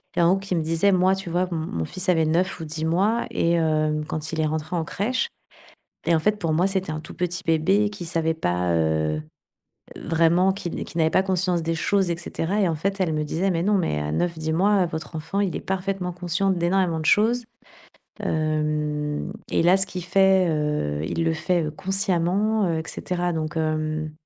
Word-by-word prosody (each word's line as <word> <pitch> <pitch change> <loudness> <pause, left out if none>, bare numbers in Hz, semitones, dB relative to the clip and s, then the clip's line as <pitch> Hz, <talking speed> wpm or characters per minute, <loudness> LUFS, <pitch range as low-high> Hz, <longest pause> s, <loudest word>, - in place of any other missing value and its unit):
Et - - +2
en 170 - +5
gros 195 - +2
qui 195 -1 -4
me 165 - +1
disait 165 +5 +2
moi 185 +1 +3
tu 190 -3 -6
vois 180 +1 +1
m 165 - -1 0.2
mon 80 -1 -1
fils 185 +2 -5
avait 160 -3 +3
9 175 +4 0
ou 160 - -5
10 155 +1 -4
mois 200 +8 +1
et 170 -6 +1
hem 155 -2 +1
quand 160 -1 -4
il 160 - 0
est - - +2
rentré 155 +2 -2
en 165 - 0
crèche, 250 - -1 0.8
et 170 - +4
en - - +2
fait 210 +5 +1
pour 165 -2 0
moi, 175 +4 +3
c'était 190 -5 -2
un 155 - -5
tout - - -10
petit 180 +1 -3
bébé 190 +6 +2
qui 200 -4 -8
savait 160 -1 0
pas, 90 - -1
heu 80 -1 +1 0.8
heu, - - -8
vraiment 170 +3 +3
qui 195 -2 -5
n - - -4
qui - - -12
n'avait 160 0 +3
pas 190 - +3
conscience 180 -2 0
des 165 0 -1
choses, 190 +2 +1
et 170 - 0
cetera. 170 +3 -2
Et 190 - +3
en 165 - 0
fait, 195 +5 -2
elle 175 -4 +1
me 155 - 0
disait: 175 +6 0
«Mais 170 -2 0
non, 205 +2 +2
mais 120 - 0
à 75 0 -3
9 170 - -1
10 160 0 -2
mois, 195 +2 +3
heu, - - 0
votre 160 0 -6
enfant, 195 +6 -2
il 195 -4 0
est - - -3
parfaitement 190 -1 -2
conscient 175 +2 0
d'énormément 175 -1 +1
de 155 - -5
choses, 235 +4 +3 0.8
hem, 150 -1 -1 0.2
et - - +2
là 180 +2 +6
ce 190 - +2
qu'il 180 -2 -6
fait, 190 0 +4
heu, 150 - -1
il 165 - -1
le 165 - +2
fait, 175 0 0
heu, 155 - -2
consciemment, 195 +3 +1
heu, 160 -1 0
et - - -3
cetera.» 175 -1 -2
Donc 160 0 -3
hem, 155 -1 -1
170 Hz, 225 wpm, -24 LUFS, 155-190 Hz, 0.8 s, là